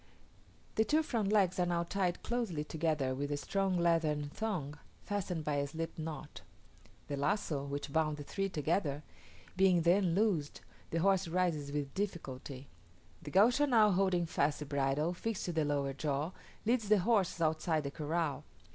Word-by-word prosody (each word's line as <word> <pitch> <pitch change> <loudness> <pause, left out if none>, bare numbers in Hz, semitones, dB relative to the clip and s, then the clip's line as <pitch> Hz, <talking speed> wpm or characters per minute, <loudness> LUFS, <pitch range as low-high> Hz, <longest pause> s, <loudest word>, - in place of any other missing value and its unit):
The 220 - +5
two 305 +7 +2
front 220 -8 -1
legs 190 -4 +3
are 180 - +3
now 170 -1 +1
tied 180 0 -1
closely 225 -11 -1
together 155 -4 -1
with 140 +2 -3
a 145 - 0
strong 195 +3 0
leathern 160 -4 +1
thong, 160 -10 -3 0.2
fastened 185 -5 -2
by 150 -1 0
a 140 0 0
slip 165 +3 -5
knot. 155 -2 -6 0.7
The 145 - -2
lazo, 145 -1 0
which 140 0 -5
bound 155 -2 +1
the 145 - -6
three 195 +6 -2
together, 150 -2 -1 0.5
being 185 -3 +4
then 175 0 +3
loosed, 185 -8 0 0.3
the 165 - -2
horse 195 -1 +3
rises 165 -5 0
with 145 -1 -3
difficulty. 140 -9 -5 0.5
The - - -7
Gaucho 245 - +4
now 220 -5 +5
holding 185 -2 +2
fast 145 -3 +1
the 150 - -6
bridle 140 +3 0
fixed 220 +3 -3
to 175 - -2
the 160 -2 +1
lower 140 -2 0
jaw, 145 +3 -2 0.3
leads 225 -2 +1
the 215 - +6
horse 195 -3 +2
outside 160 0 +1
the 140 - -4
corral. 155 -1 -2
165 Hz, 165 wpm, -33 LUFS, 145-195 Hz, 0.7 s, the